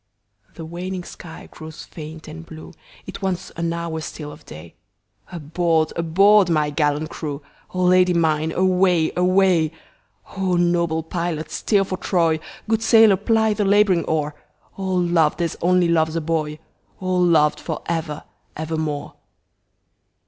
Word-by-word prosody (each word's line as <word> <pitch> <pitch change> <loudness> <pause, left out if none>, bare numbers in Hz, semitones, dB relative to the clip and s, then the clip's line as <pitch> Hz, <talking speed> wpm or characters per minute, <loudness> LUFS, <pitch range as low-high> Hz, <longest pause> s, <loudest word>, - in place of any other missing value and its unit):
The 165 - -8
waning 180 +2 -5
sky 165 -1 -11
grows 155 0 -10
faint 160 0 -10
and 80 - -9
blue, 80 0 -11 0.3
It - - -8
wants 190 -2 -3
an 170 0 -3
hour 170 -1 -4
still 150 -1 -7
of 145 +2 -14
day, 80 +2 -11 0.6
Aboard! 165 -1 0
aboard! 190 +4 +4
my 150 -3 +1
gallant 150 +1 0
crew,O 150 +4 -6
Lady 180 0 +4
mine 160 -1 +1
away! 180 -2 +2
away!O 180 +1 0
noble 170 -2 +1
pilot 165 -2 -4
steer 205 -3 +1
for 185 -1 -4
Troy, 165 -5 +1 0.3
Good 225 0 +1
sailor 225 -3 +6
ply 220 +2 +1
the 210 - -1
labouring 200 -3 +3
oar,O 160 +5 -5
loved 175 -4 +2
as 170 -2 -1
only 180 0 +3
loves 160 -1 +1
a 165 - 0
boy!O 160 +3 -4
loved 165 -4 +3
for 160 -3 -5
ever 160 -3 -3 0.3
evermore! 155 -2 -3
170 Hz, 130 wpm, -21 LUFS, 155-185 Hz, 0.6 s, sailor